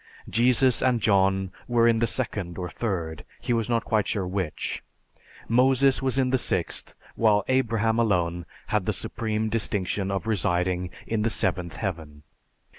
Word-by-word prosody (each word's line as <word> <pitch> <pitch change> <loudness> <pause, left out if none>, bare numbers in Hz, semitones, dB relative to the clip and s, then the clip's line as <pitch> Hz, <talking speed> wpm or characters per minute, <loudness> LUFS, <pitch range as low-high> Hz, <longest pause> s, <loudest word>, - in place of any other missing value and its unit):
Jesus 125 +1 +3
and 125 -2 +2
John 95 -2 +2 0.2
were 120 -1 +3
in 115 -1 +3
the 115 - +2
second 100 -10 -2
or 90 -2 -4
third 85 -9 -3 0.2
he 120 - -1
was 115 0 -1
not 115 -1 +1
quite 105 -3 +1
sure 100 -4 -1
which 90 -4 -3 0.7
Moses 130 +3 +4
was 130 0 0
in 130 -1 +2
the 130 - +2
sixth, - - -1 0.2
while 105 -3 +3
Abraham 115 -3 +1
alone 85 -6 0 0.2
had - - +1
the - - 0
supreme 110 -2 -2
distinction 100 -3 -1
of 95 +1 -2
residing 90 -4 0 0.2
in 110 -1 -1
the 115 - +1
Seventh 90 -6 -1
Heaven. 80 -7 -5
110 Hz, 155 wpm, -26 LUFS, 90-115 Hz, 0.7 s, Moses